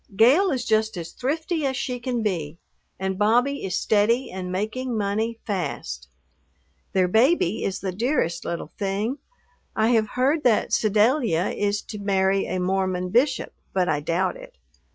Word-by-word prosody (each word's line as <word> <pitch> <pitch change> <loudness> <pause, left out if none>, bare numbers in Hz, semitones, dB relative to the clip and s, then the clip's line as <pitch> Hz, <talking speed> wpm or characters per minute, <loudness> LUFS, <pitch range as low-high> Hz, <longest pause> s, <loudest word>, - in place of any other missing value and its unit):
Gale 280 - +5
is 260 -6 -1
just 220 -2 +1
as 170 -1 -6
thrifty 315 +4 -2
as 265 -2 0
she 255 -2 -3
can 240 -1 -2
be 165 -7 -2 0.4
and 190 0 -2
Bobby 245 +7 +2
is 190 -1 -2
steady 225 +5 +2
and 185 -1 -5
making 220 +6 -2
money 215 +3 -1
fast. 70 - -4 0.9
Their 185 -1 +3
baby 220 - +2
is 195 - -2
the 190 - -2
dearest 185 - 0
little 170 -2 -5
thing. 205 +7 -1 0.6
I 220 +1 +2
have 220 -3 +2
heard 285 +5 +2
that 230 -4 +2
Sedalia 215 - +2
is 205 0 -1
to 210 - -8
marry 195 -1 +1
a 185 - -2
Mormon 185 0 0
bishop, 260 +5 +1 0.2
but 185 -2 +1
I 150 - +1
doubt 170 - 0
it. - - -13
210 Hz, 155 wpm, -24 LUFS, 185-250 Hz, 0.9 s, Gale